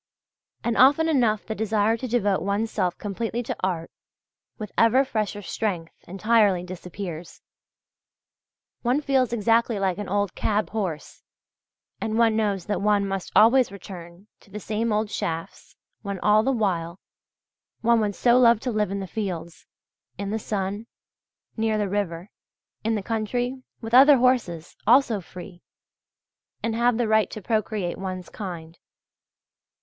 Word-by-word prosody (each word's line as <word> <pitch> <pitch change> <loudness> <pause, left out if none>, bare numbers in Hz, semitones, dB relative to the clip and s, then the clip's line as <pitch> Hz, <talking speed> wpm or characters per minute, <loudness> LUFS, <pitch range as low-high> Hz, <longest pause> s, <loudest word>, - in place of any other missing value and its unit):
And 235 -1 0
often 285 +5 +5
enough 235 -9 +2
the 220 - -3
desire 220 0 +1
to 255 +3 -5
devote 205 -5 +1
one's 205 +3 -1
self 180 -1 -1
completely 225 +4 -3
to - - -4
art, 175 -3 -2 0.7
with 210 -2 -7
ever 245 +4 +4
fresher 215 -4 -3
strength, 180 -5 -3
entirely 200 -1 +2
disappears. 180 -1 -8 1.4
One 255 +4 +1
feels 265 -4 +1
exactly 230 0 +2
like 190 -1 -1
an 205 - -5
old 200 -1 0
cab 210 0 -1
horse, 185 -9 -4 0.8
and 220 0 -1
one 230 -1 +4
knows 205 -5 0
that 205 -3 -2
one 205 -1 +2
must 195 -2 -4
always 240 +1 +5
return 180 -2 -11
to - - -22
the 210 +2 -7
same 220 +2 -2
old 210 0 0
shafts 165 0 -5 0.3
when 200 -2 -4
all 210 +1 +5
the 265 +5 +1
while 185 -7 -1 0.8
one 235 0 +4
would 205 -2 -1
so 245 0 +4
love 235 -3 +5
to 250 - -2
live 210 -2 0
in 200 0 -3
the - - -4
fields, 175 -6 -5 0.5
in 200 +1 -4
the 220 - -1
sun, 205 +1 -3 0.7
near 220 -1 0
the 210 -1 0
river, 190 -2 -3 0.5
in 225 +1 +1
the 205 - -3
country, 245 +4 -2 0.2
with 225 0 -7
other 275 +3 +8
horses, 235 -10 0
also 235 -4 +4
free, 180 +1 -11 1.0
and 230 - 0
have 235 0 +2
the 240 -2 0
right 220 0 +3
to - - -7
procreate 210 -3 -2
one's 185 -1 -5
kind. 170 -5 -8
210 Hz, 150 wpm, -24 LUFS, 190-230 Hz, 1.4 s, other